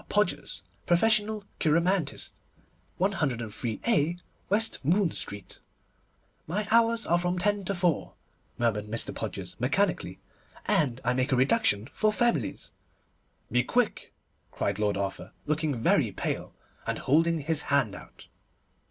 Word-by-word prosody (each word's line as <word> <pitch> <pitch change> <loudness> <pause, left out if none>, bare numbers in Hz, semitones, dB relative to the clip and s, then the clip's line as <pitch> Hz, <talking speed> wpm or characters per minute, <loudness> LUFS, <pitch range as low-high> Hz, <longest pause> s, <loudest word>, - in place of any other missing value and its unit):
PODGERS_ 210 -3 0 0.2
Professional 215 +3 +2
Cheiromantist 165 0 +1 0.7
103_a_ 150 - 0 0.3
West 220 -2 +1
Moon 175 +4 +2
Street 100 -2 -2 0.9
'My 205 +6 -1
hours 230 0 +4
are 170 +1 +3
from 180 +1 -1
ten 205 +2 +1
to 200 - -1
four,' 175 -3 0 0.4
murmured 105 -3 0
Mr. 115 +2 -1
Podgers - - -5
mechanically, - - 0 0.5
'and 130 -4 +1
I 125 +1 +2
make 130 +2 0
a - - +4
reduction 130 - +2
for 215 0 +2
families.' 210 - 0 0.8
'Be 125 +1 +4
quick,' 245 - 0 0.4
cried 100 0 -2
Lord 105 -1 +1
Arthur, 100 -1 -4
looking 155 -4 -1
very - - +3
pale, - - -4 0.3
and - - -1
holding 165 +4 +2
his 155 +1 +2
hand 135 -7 +2
out. - - -12
165 Hz, 120 wpm, -28 LUFS, 125-205 Hz, 0.9 s, hours